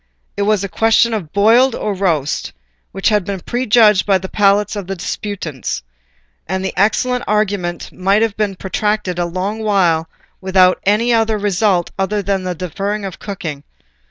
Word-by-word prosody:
It - - -3
was 210 -2 +2
a - - -2
question 225 +3 +2
of 180 -8 -4
boiled 230 +5 +4
or 210 - -2
roast, 170 -7 -1 0.4
which 195 - 0
had 210 -3 +2
been 195 +1 -4
prejudged 220 -2 +3
by 195 -2 +3
the 190 +1 -6
palates 205 +1 +2
of 200 -3 -5
the 195 - -3
disputants, 175 - -5 0.6
and 190 +2 -2
the - - -3
excellent 250 +5 +1
arguing 200 -5 0
might 195 +4 +1
have 220 -3 -1
been 210 -2 -1
protracted 195 -1 -2
a 175 - +1
long 185 +5 -3
while 175 -6 +1 0.3
without 185 -1 +3
any 220 +4 +2
other 225 -1 +2
result 200 -3 +1
than 200 +1 -1
that 195 -2 -1
of 180 - -4
deferring 200 +4 -3
the 195 - -4
cooking. 170 -7 -6
200 Hz, 165 wpm, -17 LUFS, 185-210 Hz, 0.6 s, boiled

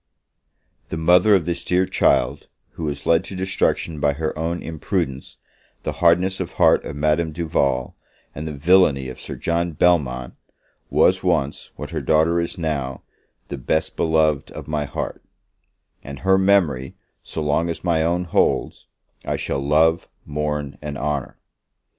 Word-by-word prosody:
The - - -4
mother 90 +6 +5
of 90 -5 +1
this 85 0 -3
dear 90 +1 +2
child, 60 - +1 0.2
who 80 - -6
was 70 -1 -4
led 85 +2 +3
to 95 - -7
destruction 90 -4 -1
by 70 0 +2
her 80 +2 -3
own 85 +2 -3
imprudence, 80 -3 -3 0.5
the - - -2
hardness 90 +2 +3
of - - -4
heart - - +4
of - - -6
Madame 75 +2 +1
Duval, 75 -6 -1 0.4
and 80 +1 -6
the - - -4
villany 75 -3 +3
of 65 - -9
Sir - - -6
John 85 0 -1
Belmont, 70 -7 +1 0.6
was 95 +1 +3
once, 80 -6 -1
what - - -7
her - - -3
daughter 80 +2 +3
is 85 +3 -3
now, 70 -6 -3 0.5
the 70 - -5
best 80 +5 -1
beloved 80 -3 +1
of - - -8
my 75 -1 -1
heart: 70 - -5 0.8
and 70 0 -9
her 95 +1 +4
memory, 85 -10 +2 0.3
so 80 - -5
long 75 +3 +1
as 85 - -5
my 85 -3 +2
own 85 +2 +1
holds, 85 - 0 0.4
I - - -2
shall 70 - -2
love, 80 +4 +2 0.2
mourn 75 -1 -3
and 75 -1 -5
honour! 70 -1 -3
80 Hz, 155 wpm, -22 LUFS, 70-85 Hz, 0.8 s, mother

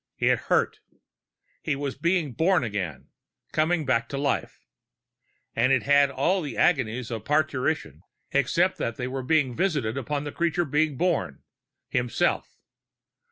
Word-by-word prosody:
It - - +2
hurt. - - +2 0.8
He - - -1
was 140 -1 -3
being 170 -5 0
born 170 +2 +2
again 95 - -4 0.4
coming 155 0 +1
back 115 -3 +1
to 140 - -4
life 140 0 -1 1.0
and 120 +3 +3
it 130 -4 +3
had 140 +3 +5
all 155 +8 +1
the 145 -7 -5
agonies 125 -7 +1
of 115 -3 -4
parturition, 150 - 0 0.3
except 170 +7 +2
that 115 - -2
they 125 - -3
were 130 +1 -3
visited 140 - +1
upon 145 +2 -3
the 145 - -5
creature 170 +2 0
being 150 0 +1
born, 170 - -1 0.4
himself. 125 -1 -1
140 Hz, 135 wpm, -26 LUFS, 125-155 Hz, 1.0 s, had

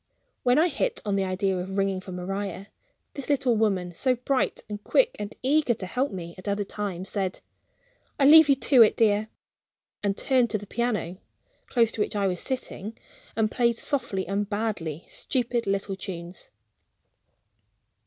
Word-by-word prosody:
When 250 +1 +3
I 325 +3 +5
hit 440 - -1
on 205 -1 0
the 195 - +1
idea 190 +1 0
of 190 +2 -4
ringing 195 -1 0
for 185 - -9
Maria, 195 +2 -4 0.4
this 280 -1 -7
little 265 -4 +2
woman, 195 -5 0
so 255 +8 +1
bright, 255 +2 -1
and 205 -1 -6
quick - - +3
and 205 0 -5
eager 275 -2 +3
to 195 - -5
help 255 +9 -1
me 170 -2 -6
at 185 - -11
other 200 0 0
times, 195 -2 -5
said 190 -3 -2 0.8
"I 275 - +4
leave 310 +1 +9
it 275 -1 +3
to 255 -5 +7
you, 215 - +6
dear," 215 -1 +2 0.7
and 200 -1 -1
turned 255 -3 +2
to 215 - 0
the 205 - -9
piano 210 -6 -2 0.5
(close 230 -2 +2
to 215 - -3
which 210 - -1
I 200 -1 +1
was 180 -2 0
sitting), 230 -5 -5 0.4
and 220 -1 +1
played 235 -2 +2
softly 235 -11 -1
and 200 +1 -2
badly 205 -8 -3
stupid 240 -2 -2
little 195 0 -1
tunes. 180 -2 -8
210 Hz, 170 wpm, -26 LUFS, 190-245 Hz, 0.8 s, leave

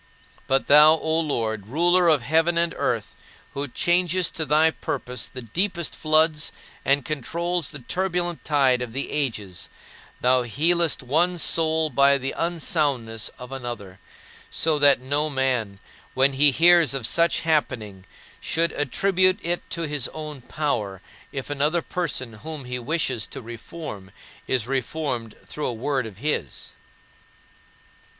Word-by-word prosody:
But 135 0 +2
thou, 150 +2 +8
O 160 0 0
Lord, 110 -9 -2
ruler 175 +7 +3
of 150 -6 +4
heaven 160 +5 +2
and 170 0 +1
earth, - - -2 0.4
who 140 +1 -3
changest 175 +5 +1
to 160 - -1
thy 155 +3 +4
purposes 125 -5 -5
the 130 -1 -7
deepest 170 - -2
floods 155 0 +2 0.3
and 140 0 +2
controls 170 +3 -2
the 150 - -8
turbulent 175 -6 -1
tide 135 -4 +2
of 120 -2 -5
the 135 +2 -3
ages, 110 -11 -3 0.5
thou 125 +1 +3
healest 160 +7 +1
one 170 +8 +2
soul 160 -1 +1
by 140 0 +5
the 135 0 -4
unsoundness 145 -9 -1
of 125 +1 -10
another; 120 -8 -7 0.5
so 155 -2 +1
that 145 -1 +5
no 145 +4 0
man, 130 -7 -1 0.4
when 135 +1 +4
he 145 +2 +6
hears 170 -2 +5
of 130 -4 -1
such 170 +7 +2
a - - -11
happening, 115 - -1 0.4
should 165 +1 0
attribute 185 +6 +2
it 175 +1 -1
to 170 - -3
his 150 -4 -1
own 150 -3 -7
power 110 -9 -2 0.3
if 135 +1 -5
another 150 +4 +1
person 145 -9 -3
whom 155 -4 -7
he 125 0 -4
wishes 130 -4 -1
to - - -8
reform 115 - -8 0.4
is 130 -4 0
reformed 130 -3 -3
through 150 - -4
a - - -1
word 130 +1 -2
of 100 -4 -12
his. 150 +7 -3
145 Hz, 145 wpm, -24 LUFS, 125-165 Hz, 0.5 s, thou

